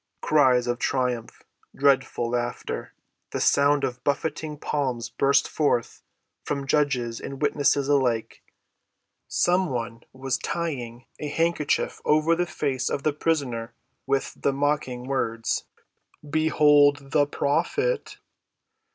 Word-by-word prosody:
Cries 130 -5 +4
of 120 0 -1
triumph, 125 -4 -2 0.3
dreadful 135 -4 +2
laughter, 120 0 -3 0.3
the - - -3
sound 140 0 +3
of 125 -1 -3
buffeting 150 +1 -2
palms 130 -6 -2
burst 140 0 +2
forth 145 -6 0 0.4
from 140 -1 -3
judges 135 -5 0
and 135 -1 -7
witnesses 145 -1 +2
alike. 130 -6 0 0.9
Some 180 0 +2
one 115 -2 -4
was 130 0 -3
tying 130 -8 -4
a 150 - -4
handkerchief 165 0 0
over 155 +2 +3
the 175 +1 -1
face 135 -5 -2
of 140 - -3
the 155 - +1
prisoner 140 -7 -2 0.3
with 135 0 0
the 140 - 0
mocking 140 -3 -1
words, 115 -4 -1 0.6
"Behold 145 -2 +3
the 145 -1 +3
Prophet!" 425 - -1
140 Hz, 115 wpm, -25 LUFS, 125-150 Hz, 0.9 s, Cries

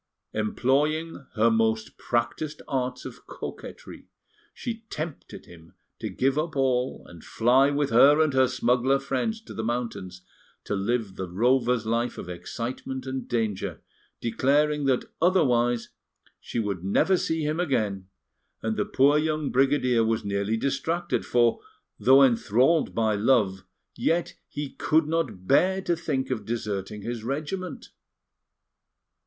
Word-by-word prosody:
Employing 140 +7 0
her 115 +2 +4
most 110 0 0
practised 135 +6 -2
arts 125 -2 -2
of - - -10
coquetry, - - -9 0.4
she 230 -2 -6
tempted 155 0 -6
him 85 -1 -16 0.2
to - - -4
give 135 +3 +1
up 160 0 -3
all 130 -1 0
and 85 -2 -13
fly 130 +4 +3
with 145 -1 0
her 140 +6 +6
and 155 -3 +3
her 130 -1 +4
smuggler 125 +1 +2
friends 215 - -2
to - - -10
the 110 - -4
mountains, 110 -6 -4 0.4
to - - -4
live 105 0 -1
the 95 -2 -4
rover's 120 +4 +2
life 115 +2 -1
of 90 - -7
excitement 125 +8 -5
and 130 0 -4
danger, 110 -5 -2 0.4
declaring 145 +5 +1
that, 130 -2 +1 0.2
otherwise, 120 -10 +2 0.5
she - - -7
would 100 -6 -2
never 100 - +3
see 160 -3 -1
him 155 +2 -1
again; 105 - -1 0.6
and 110 0 -1
the 105 - +1
poor 145 +3 +4
young 155 -1 -1
brigadier 130 -3 +3
was 110 0 0
nearly 100 +2 -1
distracted, 140 +7 -1
for, 120 -1 +3 0.4
though 135 +2 +6
enthralled 125 +5 +3
by 110 -1 +2
love, 105 -3 +2 0.3
yet 170 +2 0
he 145 -1 -5
could 160 0 +2
not 140 - -2
bear 185 - +3
to 175 -3 0
think 140 -6 -2
of 115 -5 -2
deserting 105 -2 -4
his 120 -1 -4
regiment. 155 +8 -4
125 Hz, 135 wpm, -26 LUFS, 110-145 Hz, 0.6 s, her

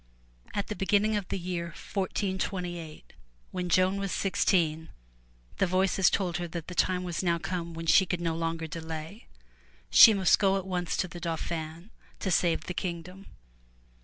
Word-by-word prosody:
At 200 - 0
the 210 - -5
beginning 205 +2 +2
of 200 -3 -2
the - - -2
year 175 -1 -3
1428, 180 -3 -4 0.4
when 180 -1 -3
Joan 185 +2 +3
was 195 -1 -3
sixteen, 165 -4 +1 0.7
the 195 - +3
Voices 190 +1 +3
told 180 -4 -1
her 175 0 -4
that 165 -1 -6
the 180 - -6
time 180 0 +1
was 175 -2 -3
now 170 -2 +1
come 170 -1 -4
when 165 0 -6
she 185 +3 +5
could 180 - -1
no 165 -1 -1
longer 165 0 -2
delay. 160 +5 -7 0.6
She 220 - +9
must 190 -3 +4
go 195 -1 +3
at 190 - -4
once 180 -2 -2
to 185 - 0
the 175 0 -9
Dauphin 165 +2 -4 0.3
to 190 - -2
save 170 -1 +2
the 180 - -5
kingdom. 180 +2 -5
180 Hz, 165 wpm, -28 LUFS, 165-190 Hz, 0.7 s, She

